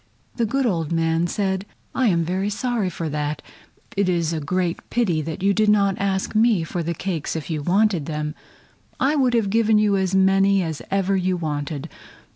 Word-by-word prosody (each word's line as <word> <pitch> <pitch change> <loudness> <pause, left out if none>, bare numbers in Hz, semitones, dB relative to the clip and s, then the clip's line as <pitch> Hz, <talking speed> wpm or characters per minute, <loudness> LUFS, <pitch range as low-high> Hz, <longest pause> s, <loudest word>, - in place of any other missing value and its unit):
The 230 -2 +1
good 270 +4 0
old 165 -8 -1
man 165 +1 +1
said: 190 0 -1 0.3
"I 260 - +2
am 170 -5 +2
very 190 +4 -1
sorry 225 -2 -1
for 165 -2 -4
that. 150 0 -3 0.5
It 200 -2 +1
is 170 -2 0
a 160 - -1
great 175 +3 -1
pity 180 -10 +1 0.2
you 200 +1 +3
did 215 +1 +2
not 200 -2 +3
ask 190 -1 -1
me 215 -5 +3
for 170 +2 -3
the 170 +1 -2
cakes 170 -3 -3
if 160 +1 -4
you 155 -2 -2
wanted 185 -1 +2
them. 150 -1 -3 0.7
I 285 +3 +2
would 255 -4 +2
have 215 -4 +1
given 220 0 +3
you 210 -1 +3
as 190 0 0
many 195 0 +4
as 160 -3 -4
ever 195 0 +1
you 185 -1 0
wanted. 150 -2 -3
190 Hz, 190 wpm, -22 LUFS, 165-205 Hz, 0.7 s, many